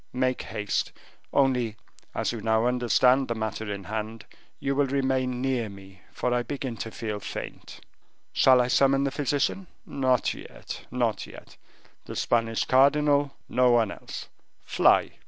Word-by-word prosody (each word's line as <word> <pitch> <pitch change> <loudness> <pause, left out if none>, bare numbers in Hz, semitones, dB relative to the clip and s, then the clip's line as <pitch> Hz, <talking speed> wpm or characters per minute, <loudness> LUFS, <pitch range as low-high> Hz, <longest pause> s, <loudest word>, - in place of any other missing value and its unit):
Make 130 0 0
haste. 105 -1 -2 0.4
Only, 125 -5 +2 0.4
as - - 0
you 115 -2 -5
now 110 +1 +2
understand 125 +2 +3
the 115 - -2
matter 110 -1 -3
in 100 -1 -5
hand, 110 +3 -5 0.3
you 140 - -1
will 140 0 +2
remain 130 -2 0
near 125 -5 0
me, 95 -1 -13
for 125 - -1
I 120 - +2
begin 130 0 -4
to 110 - -5
feel 110 -2 -4
faint." - - -7 0.5
"Shall 130 -1 +6
I 120 - +1
summon 135 +1 +3
the 140 - 0
physician?" 145 +6 -1 0.2
"Not 130 -3 +1
yet, - - -9
not 120 -3 -1
yet... - - -13 0.5
the - - -7
Spanish 115 -1 +1
cardinal, 140 +1 +3
no 125 0 +3
one 115 -3 +3
else. - - -8 0.4
Fly." - - +3
125 Hz, 150 wpm, -26 LUFS, 110-135 Hz, 0.5 s, Shall